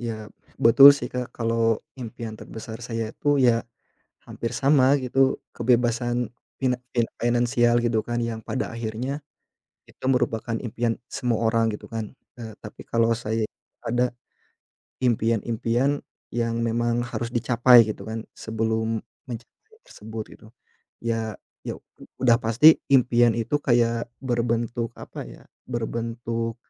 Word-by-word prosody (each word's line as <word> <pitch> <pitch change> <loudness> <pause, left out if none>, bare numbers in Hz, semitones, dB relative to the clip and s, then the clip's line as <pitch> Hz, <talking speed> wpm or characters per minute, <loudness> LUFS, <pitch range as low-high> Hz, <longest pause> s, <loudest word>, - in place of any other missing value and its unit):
Ya, 110 -3 -6 0.2
betul 140 +5 +9
sih, 125 -3 -6
Kak, 125 -1 -3
kalau 115 -1 +1 0.2
impian 115 -1 -6
terbesar 110 +1 -8
saya 115 -2 -4
itu, 145 0 +1
ya 120 -3 +3 0.5
hampir 115 - -5
sama 135 -1 +4
gitu 130 +1 +2
kebebasan 120 0 +1 0.3
finan 125 -2 +1 0.4
finansial 120 0 +2
gitu 120 -2 +1
kan 120 0 -2
yang 115 -1 -3
pada 130 - -2
akhirnya, 120 +6 -4 0.6
itu - - -21
merupakan 115 -3 0
impian 115 0 -2
semua 120 -4 -1
orang 115 -1 +2
gitu - - -13
kan, 110 -2 -5 0.3
eee, 110 -1 -7
tapi 105 - -11
kalau 115 0 +3
saya 110 -1 -1 0.4
ada 120 +2 +1 0.9
impian-impian 120 +3 +1 0.3
yang 115 -1 0
memang 120 +1 0
harus 120 -1 -4
dicapai 120 -1 +6
gitu 110 - -5
kan, 110 0 -5
sebelum 110 0 -1 0.3
mencapai 440 - -11
tersebut 110 +1 -7
gitu. - - -17 0.6
Ya 115 -2 -2 0.3
ya - - -5 0.4
udah 120 -2 +3
pasti 120 +8 +6
impian 120 -3 +4
itu 120 +6 0
kayak 120 -3 +1
berbentuk 120 -2 -1
apa - - -8
ya, - - -13 0.3
berbentuk, 115 -1 -3
115 Hz, 125 wpm, -24 LUFS, 115-125 Hz, 0.9 s, betul